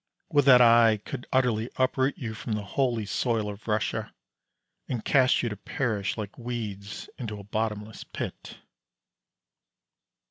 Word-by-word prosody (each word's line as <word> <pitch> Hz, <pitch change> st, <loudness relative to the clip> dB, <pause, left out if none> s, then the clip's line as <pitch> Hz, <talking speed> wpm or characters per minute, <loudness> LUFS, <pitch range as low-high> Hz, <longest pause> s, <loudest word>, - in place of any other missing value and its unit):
Would 145 Hz, -2 st, +3 dB
that 125 Hz, -3 st, +8 dB
I 115 Hz, -2 st, +6 dB
could 105 Hz, +4 st, -7 dB
utterly 125 Hz, -3 st, +2 dB
uproot 130 Hz, +1 st, +1 dB
you 115 Hz, -3 st, -4 dB
from 110 Hz, +1 st, -4 dB
the 105 Hz, -1 st, -2 dB
holy 120 Hz, +1 st, 0 dB
soil 110 Hz, 0 st, 0 dB
of 105 Hz, +2 st, -8 dB
Russia, 110 Hz, 0 st, -1 dB, 0.8 s
and 120 Hz, -4 st, -3 dB
cast 130 Hz, -2 st, +4 dB
you 120 Hz, -, 0 dB
to 105 Hz, -, -5 dB
perish 105 Hz, -2 st, -2 dB
like 105 Hz, 0 st, -6 dB
weeds 110 Hz, -4 st, -5 dB
into 105 Hz, -4 st, -5 dB
a -, -, -9 dB
bottomless 105 Hz, +1 st, -3 dB
pit. -, -, -7 dB
115 Hz, 140 wpm, -27 LUFS, 105-125 Hz, 0.8 s, that